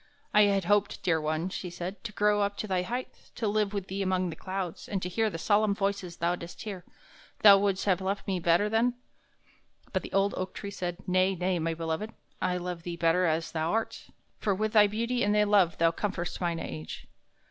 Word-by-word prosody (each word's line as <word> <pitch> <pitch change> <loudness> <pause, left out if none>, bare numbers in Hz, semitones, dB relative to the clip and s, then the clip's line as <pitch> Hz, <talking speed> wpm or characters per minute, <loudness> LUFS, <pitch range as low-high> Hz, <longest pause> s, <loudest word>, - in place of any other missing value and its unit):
"I 210 0 +7
had 195 -2 +1
hoped, 205 +2 +1
dear 165 -3 +2
one," 155 +3 -1
she 185 -1 -5
said, 175 +3 -6
"to 220 - -4
grow 210 0 +2
up 200 0 -1
to 215 - -3
thy 185 -2 +1
height, 245 +7 -6
to 225 - -1
live 205 -1 +1
with 200 -3 -3
thee 195 +1 -4
among 185 -2 0
the - - -7
clouds, 185 -1 -5
and 200 - -1
to 180 - -2
hear 220 +4 +1
the 165 - -5
solemn 205 +3 +2
voices 195 -3 -2
thou 170 +1 +1
didst 170 -1 -9
hear. 195 -5 -6 0.6
Thou 200 -2 +9
wouldst 195 -1 0
have 190 -2 +2
loved 195 +1 -2
me 190 -2 -1
better 170 +4 +3
then?" 230 +3 +2 1.0
But - - +1
the - - -9
old 195 +1 +2
oak 185 0 -4
tree 200 - -6
said: 180 -1 -5
"Nay, 185 +1 +3
nay, 180 0 0
my 165 0 -1
beloved; 165 +7 -3 0.3
I 180 - +1
love 180 -1 -4
thee 170 0 -5
better 170 +2 +3
as 160 +1 0
thou 160 +2 -1
art, 225 0 -2 0.3
for 205 -4 +1
with 215 +2 -1
thy 210 -2 +7
beauty 235 +4 -1
and 205 +1 +2
thy 210 - +5
love 200 -5 +3
thou 165 0 +4
comfortest 190 0 -3
mine 170 -1 0
age." 80 - -6
190 Hz, 220 wpm, -29 LUFS, 175-205 Hz, 1.0 s, Thou